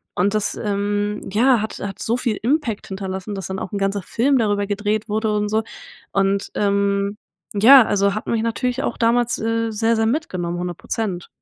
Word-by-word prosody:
Und 200 +3 +1
das, 205 -1 0
ähm, 205 0 -1
ja, 235 +2 +4
hat 220 - -4
hat 195 -2 -6
so 230 +2 0
viel 235 -4 -1
Impact 255 -4 0
hinterlassen, 190 +1 -5
dass 190 -3 -5
dann 190 0 -4
auch - - -6
'n - - -1
ganzer 195 +1 0
Film 265 +9 +1
darüber 205 -2 +1
gedreht 210 +2 -1
wurde 220 +1 0
und 210 0 0
so 220 +1 +1 0.5
und, 195 0 +1
ähm, 200 0 +1 0.4
ja, 235 +5 +8
also 200 -1 +2
hat 215 - -5
mich 225 -1 0
natürlich 250 +3 -1
auch - - -2
damals, 240 +1 +2
äh, 225 0 -1
sehr, 225 +2 +1
sehr 225 - +1
mitgenommen, 185 - -2
100%. 180 +1 -4
210 Hz, 185 wpm, -21 LUFS, 200-230 Hz, 0.5 s, ja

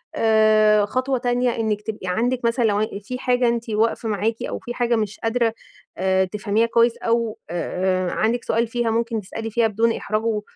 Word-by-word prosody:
آآ، 215 -1 +4
خطوة 255 +4 -1
تانية 245 0 0
إنك 215 -2 -1
تبقى 210 -3 -6
عندِك 240 +6 0
مثلًا 235 +1 +1
لو 210 0 +1 0.2
في 250 +4 -5
حاجة 250 -1 +2
أنتِ 235 0 -1
واقفة 225 +1 0
معاكِ 220 +2 -1
أو - - -4
في 240 - -6
حاجة 240 -1 +1
مش 215 -2 -3
قادرة 225 0 0 0.4
آآ، 190 +1 +2
تفهميها 210 +3 0
كويس 230 0 +3
أو 230 -1 -1
آآ، 185 +1 -1
عندِك 235 +2 0
سؤال 230 +1 0
فيها، 235 0 -1
ممكن 230 -1 -1
تسألي 225 +3 -6
فيها 230 +1 +2
بدون 225 +2 +1
إحراج، 215 +1 -2
و 220 -2 0
225 Hz, 180 wpm, -22 LUFS, 210-235 Hz, 0.4 s, آآ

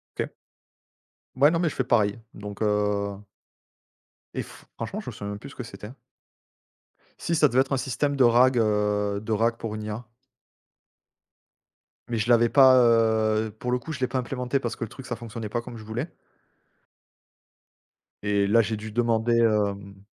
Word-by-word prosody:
OK. - - -3 1.0
Ouais, 140 +3 +6
non, 165 - +1
mais 170 -1 +2
je - - -8
fais 130 - -1
pareil, 110 -3 +2 0.2
donc 100 -1 -8
heu 105 -1 0 1.2
et - - -2
f - - -15
franchement, - - -4
je - - -7
me - - -10
souviens 100 - -6
même 100 - -5
plus 140 +6 -11
ce - - -13
que - - -6
c'était 105 -1 -10 1.3
si 170 - -1
ça 155 -2 +5
devait 130 0 +3
être 135 +1 -1
un - - +3
système 135 +3 -1
de 135 - +4
RAG, 120 +2 +5
heu, 105 -2 +1
de 110 - -3
RAG 115 +2 +1
pour 115 -2 -5
une 110 0 -5
IA 110 +3 -5 2.0
mais 115 - -2
je 110 +2 -1
l'avais 120 0 +5
pas, 130 0 +7
heu, 110 -2 +3
pour 125 - -2
le 125 - +2
coup, 125 +6 -7
je 140 - -6
l'ai 130 - +1
pas 130 - -1
implémenté, 125 +1 -2
parce 120 -3 -3
que - - -3
le - - -8
truc, 135 - -10
ça 120 - -3
ne - - -11
fonctionnait 115 -1 -6
pas 120 +3 -2
comme 120 0 -9
je 110 - -10
voulais 120 +9 -4 2.1
et 100 -1 +1
là, 115 +3 +4
j'ai 110 +1 -2
dû 110 +1 -8
demander, 115 0 +1
hem 100 -3 0
115 Hz, 190 wpm, -25 LUFS, 105-125 Hz, 2.1 s, pas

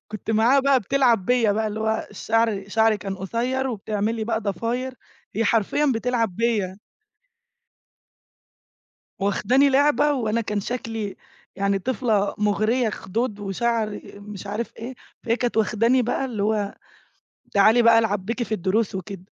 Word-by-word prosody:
كنت 215 +1 -6
معاها 235 +6 +4
بقى 270 -2 +3
بتلعب 235 -3 +2
بيّا 240 -4 +3
بقى 220 +1 0
اللي 215 +1 -4
هو 220 0 -1
شعري 220 -3 0
شعري 220 0 +3
كان 195 0 -5
قصير 245 +7 -2
وبتعمل 215 -1 -2
لي 220 -1 -3
بقى 225 -1 -1
ضفاير 230 +6 -3 0.4
هي 225 +2 +1
حرفيًا 235 +7 +2
بتلعب 230 -5 -1
بيّا. 210 -5 0 2.4
واخداني 255 +8 +3
لعبة 290 +2 +3
وأنا 230 -4 0
كان 210 -2 -2
شكلي 225 -2 -4 0.4
يعني 200 0 +1
طِفلة 215 -2 0
مُغريّة، 215 +3 +1
خدود 210 +1 -3
وشعر 215 +2 -1
مش 205 -1 -9
عارف 215 +3 -4
إيه 245 +3 -7 0.3
فهي 235 -1 +1
كانت 245 -2 -2
واخداني 230 +4 +3
بقى 245 +3 -1
اللي 225 -6 -3
هو 210 -1 0 0.8
تعالِي 215 +4 +5
بقى 230 -1 +6
العب 205 -4 -1
بيكِ 235 +3 -2
في - - -11
الدروس 195 +2 0
وكده. 190 0 -7
220 Hz, 140 wpm, -23 LUFS, 205-240 Hz, 2.4 s, بقى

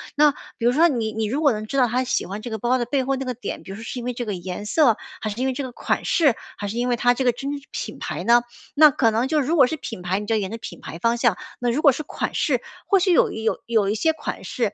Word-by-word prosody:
那， 295 0 +6 0.3
比 230 - -2
如 - - +5
说 320 +7 +5
你 230 -7 -1
你 220 0 -2
如 265 +8 -1
果 290 -3 +5
能 215 0 -4
知 215 - -6
道 250 -2 +5
她 250 +3 0
喜 255 - -1
欢 200 +3 -6
这 240 - -5
个 220 - -3
包 245 +4 +2
的 240 - -1
背 265 +2 0
后 270 +1 0
那 265 0 -4
个 250 - -2
点， 230 -3 -6
比 - - -9
如 - - -6
说 225 - -9
是 240 - -6
因 240 - -6
为 250 - -2
这 240 0 -4
个 205 - -2
颜 180 +2 -6
色？ 260 -3 +4 0.3
还 215 - -2
是 210 - -7
因 265 - +1
为 265 - 0
这 280 - -4
个 260 - -6
款 - - -2
式？ 290 -9 +3 0.2
还 205 - -4
是 210 +3 -4
因 245 +1 0
为 245 - +2
它 245 +1 +3
这 265 - -1
个 245 - +4
真 270 +4 -5 0.2
品 - - -5
牌 - - -4
呢？ 235 +1 +5 0.3
那 305 0 +8
可 245 -4 +3
能 230 +4 +1
就 305 +2 +2
如 295 +4 +1
果 280 -6 +7
是 315 - -3
品 225 -9 -7
牌， 180 +2 -1
你 210 - -6
就 225 - +1
沿 195 -3 -1
着 225 - -4
品 225 - -9
牌 165 - -8
方 230 +4 +1
向， 235 -6 +2 0.2
那 245 - 0
如 270 +6 0
果 285 - +7
是 305 - -4
款 - - -4
式， - - +1 0.2
或 395 -3 +4
许 365 0 +3
有 - - +4
一 220 - -5
有 225 - 0
有 220 -4 +2
一 210 - 0
些 320 +9 +2
款 295 -9 -6
式， 210 +2 -2
240 Hz, 345 characters per minute, -23 LUFS, 220-270 Hz, 0.3 s, 那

